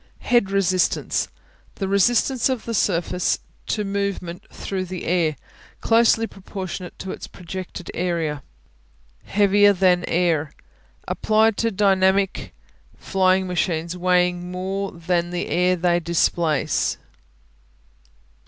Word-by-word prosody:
Head 240 Hz, -5 st, +2 dB
Resistance 190 Hz, -2 st, +1 dB, 0.5 s
The 195 Hz, -, -3 dB
resistance 240 Hz, +6 st, +2 dB
of 255 Hz, -4 st, -3 dB
a 230 Hz, -, -2 dB
surface 180 Hz, -3 st, +1 dB, 0.3 s
to 210 Hz, -, -1 dB
movement 195 Hz, -3 st, -3 dB
through 190 Hz, -1 st, -4 dB
the 185 Hz, 0 st, -6 dB
air; 165 Hz, -3 st, +1 dB, 0.4 s
closely 225 Hz, 0 st, +3 dB
proportionate 190 Hz, -3 st, -7 dB
to 190 Hz, -, -6 dB
its -, -, -7 dB
projected 180 Hz, 0 st, -8 dB
area. 165 Hz, -5 st, -2 dB, 0.8 s
Heavier 205 Hz, 0 st, +4 dB
than 180 Hz, -1 st, +3 dB
air 165 Hz, -4 st, +1 dB, 0.5 s
Applied 220 Hz, 0 st, +2 dB
to 230 Hz, -, +1 dB
dynamic 195 Hz, -1 st, +2 dB, 0.5 s
flying 190 Hz, 0 st, +2 dB
machines 170 Hz, -2 st, -1 dB
weighing 180 Hz, 0 st, +1 dB
more 190 Hz, +2 st, -3 dB
than 175 Hz, 0 st, -1 dB
the 175 Hz, 0 st, -3 dB
air 180 Hz, +1 st, +2 dB
they 175 Hz, 0 st, +2 dB
displace. 165 Hz, -2 st, +1 dB
185 Hz, 105 wpm, -22 LUFS, 175-200 Hz, 0.8 s, Heavier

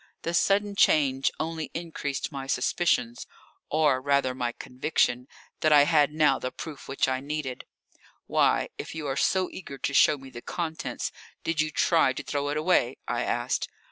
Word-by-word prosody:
The 170 Hz, -, -2 dB
sudden 200 Hz, +3 st, +2 dB
change 135 Hz, -7 st, +3 dB
only 160 Hz, 0 st, -3 dB
increased 160 Hz, -5 st, -4 dB
my 135 Hz, -2 st, -6 dB
suspicions, 125 Hz, -3 st, 0 dB, 0.4 s
or 150 Hz, -4 st, +2 dB
rather 140 Hz, -1 st, +2 dB
my 125 Hz, -2 st, -2 dB
conviction, 125 Hz, -1 st, -1 dB, 0.3 s
that 155 Hz, -, +2 dB
I 145 Hz, -1 st, +8 dB
had 150 Hz, -1 st, +3 dB
now 150 Hz, -3 st, +3 dB
the 125 Hz, -, -4 dB
proof 155 Hz, -4 st, -8 dB
which 135 Hz, -, 0 dB
I 130 Hz, 0 st, 0 dB
needed. 140 Hz, -2 st, -5 dB, 0.6 s
"Why, -, -, +2 dB
if -, -, -6 dB
you 155 Hz, -2 st, -5 dB
are 135 Hz, -2 st, -1 dB
so 185 Hz, +5 st, +2 dB
eager 140 Hz, -7 st, -8 dB
to 140 Hz, -, -2 dB
show 150 Hz, +2 st, +5 dB
me 135 Hz, -1 st, -12 dB
the 120 Hz, -, -9 dB
contents, 160 Hz, +1 st, -4 dB, 0.3 s
did 165 Hz, -1 st, +1 dB
you 155 Hz, -, 0 dB
try 155 Hz, -3 st, +3 dB
to -, -, -6 dB
throw 145 Hz, 0 st, -2 dB
it 145 Hz, -, -1 dB
away?" 155 Hz, -6 st, +2 dB
I -, -, -1 dB
asked. -, -, -1 dB
145 Hz, 175 wpm, -27 LUFS, 135-160 Hz, 0.6 s, I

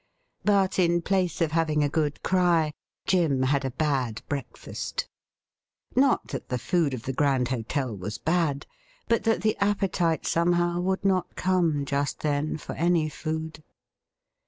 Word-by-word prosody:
But 195 Hz, -2 st, +2 dB
in 175 Hz, -1 st, +3 dB
place 185 Hz, -3 st, 0 dB
of 160 Hz, -2 st, +2 dB
having 155 Hz, -2 st, +1 dB
a -, -, +3 dB
good 150 Hz, 0 st, -1 dB
cry 175 Hz, -4 st, +2 dB, 0.3 s
Jim 160 Hz, -8 st, +2 dB
had 140 Hz, +2 st, +1 dB
a 135 Hz, -, -1 dB
bad 130 Hz, -5 st, -1 dB
breakfast. 140 Hz, -3 st, -4 dB, 0.9 s
Not 265 Hz, 0 st, +3 dB
thai -, -, -3 dB
the 125 Hz, -, -1 dB
food 155 Hz, 0 st, 0 dB
of 115 Hz, -, -8 dB
the 135 Hz, -, -3 dB
Grand 135 Hz, -3 st, +1 dB
Hotel 130 Hz, 0 st, -2 dB
was 100 Hz, +3 st, -5 dB
bad, 155 Hz, +1 st, 0 dB, 0.4 s
but 230 Hz, -, +1 dB
that 225 Hz, 0 st, +2 dB
the 215 Hz, -1 st, +2 dB
appetite 195 Hz, -5 st, +1 dB
somehow 175 Hz, +1 st, +2 dB
would 190 Hz, +2 st, -1 dB
not 185 Hz, -2 st, +1 dB
come 170 Hz, -6 st, +1 dB
just 140 Hz, 0 st, -2 dB
then 150 Hz, +1 st, 0 dB
for -, -, -7 dB
any 170 Hz, -2 st, +2 dB
food. 160 Hz, 0 st, -5 dB
160 Hz, 150 wpm, -26 LUFS, 140-180 Hz, 0.9 s, in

